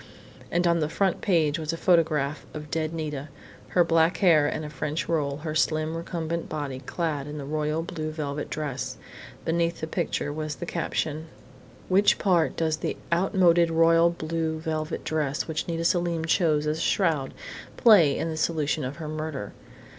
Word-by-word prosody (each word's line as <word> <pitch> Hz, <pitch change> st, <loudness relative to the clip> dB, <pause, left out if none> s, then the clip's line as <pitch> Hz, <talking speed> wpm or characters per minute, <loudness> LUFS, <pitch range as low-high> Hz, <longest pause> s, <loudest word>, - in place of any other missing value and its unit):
And 175 Hz, +1 st, +1 dB
on 170 Hz, -1 st, +3 dB
the 155 Hz, -1 st, 0 dB
front 190 Hz, +2 st, 0 dB
page 165 Hz, -5 st, +2 dB
was 155 Hz, 0 st, -2 dB
a -, -, -3 dB
photograph 155 Hz, -5 st, +2 dB
of 150 Hz, -1 st, -7 dB
dead 155 Hz, -1 st, -1 dB
Nita, 150 Hz, -3 st, -4 dB, 0.4 s
her 175 Hz, -, +3 dB
black 165 Hz, +1 st, +3 dB
hair 165 Hz, -7 st, +5 dB
in 155 Hz, -, -3 dB
a 150 Hz, -, -5 dB
French 150 Hz, +2 st, -3 dB
roll, 145 Hz, -4 st, 0 dB
her 155 Hz, -, -2 dB
slim, 155 Hz, 0 st, +1 dB
recumbent 170 Hz, 0 st, -3 dB
body 145 Hz, -4 st, -4 dB
clad 150 Hz, -1 st, -3 dB
in 150 Hz, +1 st, -6 dB
the 140 Hz, -, -5 dB
royal 155 Hz, +2 st, -1 dB
blue 155 Hz, -2 st, -4 dB
velvet 150 Hz, -2 st, -4 dB
dress. 145 Hz, -4 st, -4 dB, 0.5 s
Beneath 170 Hz, +1 st, 0 dB
the -, -, -2 dB
picture 160 Hz, -3 st, -2 dB
was 155 Hz, 0 st, -4 dB
the -, -, -6 dB
caption: 160 Hz, -2 st, -2 dB, 0.6 s
"What 195 Hz, +2 st, +4 dB
part 175 Hz, -5 st, +2 dB
does 160 Hz, -1 st, +1 dB
the -, -, -3 dB, 0.2 s
outmoded 175 Hz, -2 st, +4 dB
royal 165 Hz, +1 st, +5 dB
blue 160 Hz, -1 st, -2 dB
velvet 155 Hz, -1 st, -3 dB
dress 150 Hz, -3 st, -1 dB
which 160 Hz, -1 st, -3 dB
Nita 165 Hz, -1 st, -2 dB
Selim 170 Hz, -2 st, +1 dB
chose 160 Hz, -3 st, +2 dB
as 155 Hz, +1 st, -1 dB
a -, -, -3 dB
shroud 160 Hz, -10 st, +1 dB, 0.5 s
play 180 Hz, -, +6 dB
in -, -, -1 dB
the 160 Hz, -1 st, -4 dB
solution 155 Hz, -1 st, 0 dB
of 130 Hz, +3 st, -4 dB
her 160 Hz, -1 st, -6 dB
murder?... 155 Hz, -7 st, -5 dB
160 Hz, 175 wpm, -26 LUFS, 150-170 Hz, 0.6 s, play